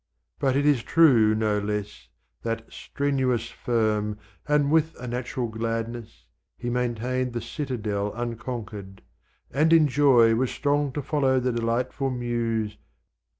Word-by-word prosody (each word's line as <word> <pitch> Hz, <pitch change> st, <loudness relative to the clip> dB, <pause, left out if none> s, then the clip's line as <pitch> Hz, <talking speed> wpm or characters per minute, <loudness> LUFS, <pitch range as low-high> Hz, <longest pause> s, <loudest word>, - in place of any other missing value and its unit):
But 135 Hz, -2 st, +1 dB
it 140 Hz, +1 st, +2 dB
is 145 Hz, -5 st, +4 dB
true, 120 Hz, -9 st, +5 dB
no 110 Hz, -1 st, +1 dB
less, 105 Hz, 0 st, -4 dB, 0.3 s
that 115 Hz, -1 st, -3 dB
strenuous, 130 Hz, -5 st, -1 dB
firm, 105 Hz, -3 st, 0 dB, 0.3 s
And 145 Hz, -1 st, +2 dB
with 160 Hz, 0 st, +2 dB
a 125 Hz, -, -7 dB
natural 125 Hz, +1 st, -3 dB
gladness, 115 Hz, +1 st, -4 dB, 0.3 s
he 120 Hz, 0 st, -3 dB
maintained 125 Hz, +1 st, -1 dB
The 120 Hz, -, -3 dB
citadel 110 Hz, -5 st, -3 dB
unconquered, 110 Hz, -5 st, -6 dB, 0.5 s
and 155 Hz, +5 st, +2 dB
in 160 Hz, -2 st, +6 dB
joy 125 Hz, -5 st, +5 dB
Was 125 Hz, +2 st, +1 dB
strong 145 Hz, -1 st, 0 dB
to 145 Hz, -, -3 dB
follow 135 Hz, -2 st, +2 dB
the 125 Hz, 0 st, 0 dB
delightful 120 Hz, +4 st, -1 dB
Muse. 115 Hz, -4 st, -2 dB
120 Hz, 130 wpm, -25 LUFS, 115-135 Hz, 0.5 s, in